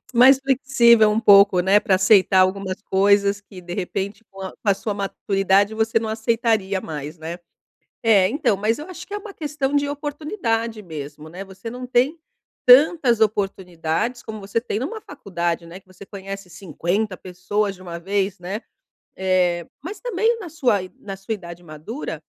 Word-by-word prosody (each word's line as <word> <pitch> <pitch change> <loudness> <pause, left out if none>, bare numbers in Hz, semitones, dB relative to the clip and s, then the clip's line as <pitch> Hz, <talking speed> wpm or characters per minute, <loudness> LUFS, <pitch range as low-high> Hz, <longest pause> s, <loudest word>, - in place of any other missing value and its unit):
Mais 260 +3 +7
flexível 250 -5 +4
um 220 +2 +1
pouco, 200 -3 +6
né, 195 +3 +4
pra 190 - +2
aceitar 190 -1 +5
algumas 190 +1 0
coisas 200 +1 +2
que, 195 -2 -13
de 175 0 -7
repente, 200 +3 -4
com 195 0 -12
a 190 - -5
com 200 -2 +4
sua 210 +1 -4
maturidade, 200 +1 +1
você 225 0 +1
não 220 -1 -4
aceitaria 220 -3 0
mais, 150 +1 -7
né? 165 +2 -6 0.7
É, 200 -4 +5
então, 230 -5 +1
mas 215 +5 0
eu 300 - -7
acho 360 -1 -9
que 405 - -8
é - - -2
uma 415 0 -10
questão 290 -3 -3
de 285 0 +1
oportunidade 285 - -3
mesmo, 150 -3 -8
né? 180 +4 -8
Você 195 +4 -9
não 250 +1 -7
tem 255 +6 +1 0.5
tantas 255 -2 +6
oportunidades 195 +1 -1
como 220 -2 -7
você 200 +3 -2
tem 230 -3 -3
numa 405 - -4
faculdade, 175 - -4
né, 180 +3 -10
que - - -39
você 185 +1 -14
conhece 195 -1 -8
50 185 +3 -2
pessoas 195 +3 -2
de 185 - -15
uma 170 -2 -7
vez, 195 +1 -1
né? 190 +5 -5 0.5
Eh, 180 -2 +1 0.2
mas 370 +8 -7
também 470 -1 0
na 385 -6 -8
sua 255 - +1
i 185 - -9
na 195 -1 -7
sua 195 +3 -6
idade 175 -3 -10
madura, 165 - -7
200 Hz, 175 wpm, -22 LUFS, 185-240 Hz, 0.7 s, Mais